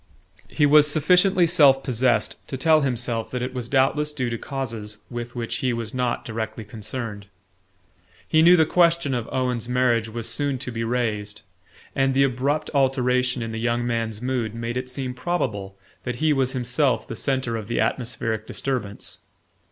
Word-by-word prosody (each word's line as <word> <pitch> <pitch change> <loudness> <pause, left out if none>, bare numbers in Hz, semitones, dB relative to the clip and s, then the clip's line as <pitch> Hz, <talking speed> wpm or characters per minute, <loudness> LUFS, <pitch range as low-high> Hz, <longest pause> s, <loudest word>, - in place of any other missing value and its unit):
He 145 - +2
was 150 +1 +6
sufficiently 180 +4 +4
self 135 -4 +5
possessed 125 -1 +1
to 130 - -4
tell 155 +3 +4
himself 120 -4 -1
that 125 -1 -3
it 130 - -4
was 125 -2 -5
doubtless 145 +3 +2
due 130 -5 -2
to 115 - -2
causes 115 -6 -5
with 120 0 -6
which 115 -1 -3
he 125 -2 0
was 115 -2 -4
not 125 -2 -1
directly 110 0 -4
concerned. 105 -1 -6 1.0
He 155 - +4
knew 175 +2 +7
the 160 - +5
question 170 -3 +3
of 120 -2 -3
Owen's 125 -2 -1
marriage 120 -3 +2
was 115 0 -5
soon 145 -2 0
to 125 -1 -5
be 115 -1 -3
raised, 105 -4 -2 0.5
and 135 0 +2
the 140 - +5
abrupt 135 +3 0
alteration 125 -2 +2
in 115 - -5
the 110 - -4
young 120 +1 0
man's 115 -2 -2
mood 125 -4 -2
made 115 +1 -4
it 125 0 -3
seem 130 -1 -4
probable 115 - -3 0.2
that 125 - -4
he 155 +4 +2
was 135 -1 0
himself 125 -1 0
the - - -6
centre 130 -4 -1
of 110 -3 -5
the 120 - -1
atmospheric 115 -3 -2
disturbance. 120 -7 -4
125 Hz, 175 wpm, -24 LUFS, 115-135 Hz, 1.0 s, knew